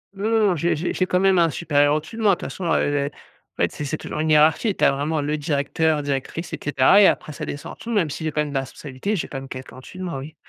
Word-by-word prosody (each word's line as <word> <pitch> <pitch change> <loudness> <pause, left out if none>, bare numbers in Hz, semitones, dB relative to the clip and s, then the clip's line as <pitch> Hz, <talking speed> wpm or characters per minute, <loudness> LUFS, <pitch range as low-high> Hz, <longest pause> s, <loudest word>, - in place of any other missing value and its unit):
Non, 205 +3 -2
non, 225 -2 +3
non. 180 - +2
J'ai 170 +3 +1
j'ai 165 +3 -2
j'ai 185 - +1
quand 180 - +2
même 190 -1 +4
un 165 -1 +4
supérieur 145 -2 +2
au-dessus 155 +8 -5
de 225 - -4
moi 200 -3 +4
de - - -15
façon, 185 - -6
heu - - +2 0.2
heu, - - -3 0.5
en - - +1
fait, - - +1
c 150 - -6
c'est 150 +2 -3
toujours - - -6
une 155 +1 0
hiérarchie, 155 +7 +4
tu - - +2
as - - +5
vraiment 145 +3 -1
le 150 +1 -1
directeur, 150 +1 0
directrice 140 +4 -4
et - - -4
cetera 145 +7 +5
et 195 - +8
après 155 - 0
ça - - -6
descends 145 - -6
en - - -8
dessous 235 - -7
même 195 -9 +1
si 160 - -6
j'ai 155 - -1
quand 150 - 0
même 150 -1 -3
des 135 - +1
responsabilités, 135 - -4
j'ai 170 - -3
quand 135 - -6
même 135 - -9
quelqu'un 130 0 -9
au-dessus 130 +7 -12
de 185 - -5
moi, 170 -7 -4
oui. 145 +4 -9
155 Hz, 305 wpm, -22 LUFS, 145-180 Hz, 0.5 s, et